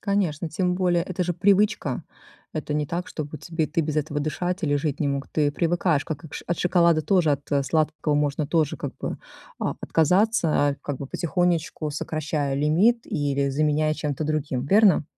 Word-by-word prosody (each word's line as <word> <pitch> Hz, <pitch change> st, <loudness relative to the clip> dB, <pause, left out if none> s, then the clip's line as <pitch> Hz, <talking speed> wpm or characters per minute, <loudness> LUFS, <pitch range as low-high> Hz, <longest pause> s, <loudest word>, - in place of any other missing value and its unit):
Конечно, 180 Hz, -6 st, 0 dB
тем 180 Hz, +2 st, 0 dB
более- 180 Hz, -2 st, +2 dB
это 180 Hz, +1 st, -3 dB
же 175 Hz, -, 0 dB
привычка. 200 Hz, +4 st, +2 dB, 0.5 s
Это 150 Hz, -1 st, -3 dB
не 150 Hz, 0 st, +1 dB
так, 175 Hz, +1 st, -4 dB
чтобы 155 Hz, -1 st, -6 dB
тебе 160 Hz, +1 st, -2 dB
ты 165 Hz, +2 st, 0 dB
без 155 Hz, -1 st, -2 dB
этого 150 Hz, 0 st, -1 dB
дышать 180 Hz, +5 st, -2 dB
или 145 Hz, -2 st, +1 dB
жить 145 Hz, -1 st, -2 dB
не 145 Hz, -, +1 dB
мог. 140 Hz, 0 st, -2 dB
Ты 150 Hz, -2 st, +1 dB
привыкаешь, 170 Hz, -1 st, +1 dB
как 155 Hz, -2 st, -5 dB
и -, -, -8 dB
к -, -, -11 dB
ш -, -, -6 dB
от 175 Hz, -, -1 dB
шоколада 170 Hz, -2 st, +3 dB
тоже, 175 Hz, -2 st, +2 dB
от 140 Hz, 0 st, 0 dB
сладкого 155 Hz, -1 st, 0 dB
можно 145 Hz, 0 st, 0 dB
тоже, 155 Hz, -2 st, +1 dB
как -, -, -5 dB
бы, -, -, -4 dB, 0.4 s
а, -, -, -1 dB
отказаться, 180 Hz, +4 st, +2 dB, 0.2 s
а, 140 Hz, -, 0 dB
как 145 Hz, -3 st, -4 dB
бы 140 Hz, -, -5 dB
потихонечку 170 Hz, -1 st, -1 dB
сокращая 150 Hz, -1 st, -2 dB
лимит 175 Hz, -, +2 dB
или 140 Hz, -2 st, 0 dB
заменяя 155 Hz, +2 st, +1 dB
чем-то 150 Hz, 0 st, -3 dB
другим, 145 Hz, -4 st, -2 dB
верно? 200 Hz, -1 st, +5 dB
155 Hz, 185 wpm, -24 LUFS, 145-175 Hz, 0.5 s, верно